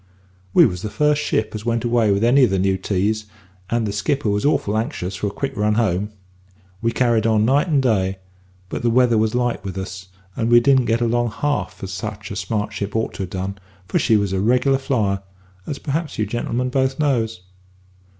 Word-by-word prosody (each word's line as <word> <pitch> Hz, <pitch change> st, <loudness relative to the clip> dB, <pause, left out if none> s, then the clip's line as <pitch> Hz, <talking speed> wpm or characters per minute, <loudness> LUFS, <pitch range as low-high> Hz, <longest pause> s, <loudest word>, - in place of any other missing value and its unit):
"We -, -, +7 dB
was 90 Hz, -1 st, -2 dB
the 105 Hz, -, -4 dB
first 150 Hz, +7 st, +2 dB
ship 110 Hz, -6 st, 0 dB
as 105 Hz, -1 st, -5 dB
went 115 Hz, 0 st, 0 dB
away 120 Hz, -2 st, +2 dB
with 100 Hz, +2 st, +1 dB
any 130 Hz, +4 st, +5 dB
of 125 Hz, -, +5 dB
the 95 Hz, -, 0 dB
new 95 Hz, +1 st, +2 dB
teas, 100 Hz, +3 st, -1 dB, 0.4 s
and 115 Hz, 0 st, 0 dB
the 105 Hz, -, -2 dB
skipper 110 Hz, +4 st, 0 dB
was 105 Hz, 0 st, 0 dB
awful 110 Hz, -8 st, +1 dB
anxious 110 Hz, -, -2 dB
for 95 Hz, +3 st, -2 dB
a -, -, -3 dB
quick 135 Hz, +6 st, -4 dB
run 105 Hz, 0 st, +1 dB
home. 105 Hz, -3 st, +1 dB, 0.7 s
We 115 Hz, -, +1 dB
carried 115 Hz, -3 st, +2 dB
on 110 Hz, -1 st, +3 dB
night 140 Hz, +8 st, +3 dB
and 145 Hz, -5 st, +2 dB
day; 95 Hz, -6 st, +1 dB, 0.5 s
but -, -, -4 dB
the 120 Hz, -, +2 dB
weather 120 Hz, -1 st, +4 dB
was 110 Hz, +1 st, +1 dB
light 120 Hz, -5 st, 0 dB
with 95 Hz, -1 st, -6 dB
us, 95 Hz, -1 st, -6 dB, 0.3 s
and 115 Hz, -1 st, -1 dB
we 120 Hz, 0 st, +7 dB
didn't 130 Hz, 0 st, +3 dB
get 115 Hz, +1 st, +1 dB
along 120 Hz, 0 st, +1 dB
half 145 Hz, -7 st, -2 dB
as 95 Hz, 0 st, -5 dB
such 105 Hz, +2 st, -6 dB
a -, -, -4 dB
smart 105 Hz, +3 st, -2 dB
ship 100 Hz, +1 st, -4 dB
ought 110 Hz, -, -1 dB
to 95 Hz, -, -4 dB
ha' -, -, -13 dB
done, 95 Hz, +2 st, -4 dB, 0.3 s
for -, -, +1 dB
she 110 Hz, -, +3 dB
was 100 Hz, -2 st, -1 dB
a 95 Hz, -, 0 dB
reg'lar 125 Hz, +6 st, +2 dB
flyer, 110 Hz, -8 st, 0 dB, 0.5 s
as 140 Hz, -, -3 dB
perhaps 150 Hz, +3 st, -3 dB
you 110 Hz, -, +1 dB
gentlemen 120 Hz, +3 st, -2 dB
both 130 Hz, 0 st, 0 dB
knows. 115 Hz, -9 st, 0 dB
110 Hz, 215 wpm, -21 LUFS, 100-125 Hz, 0.7 s, We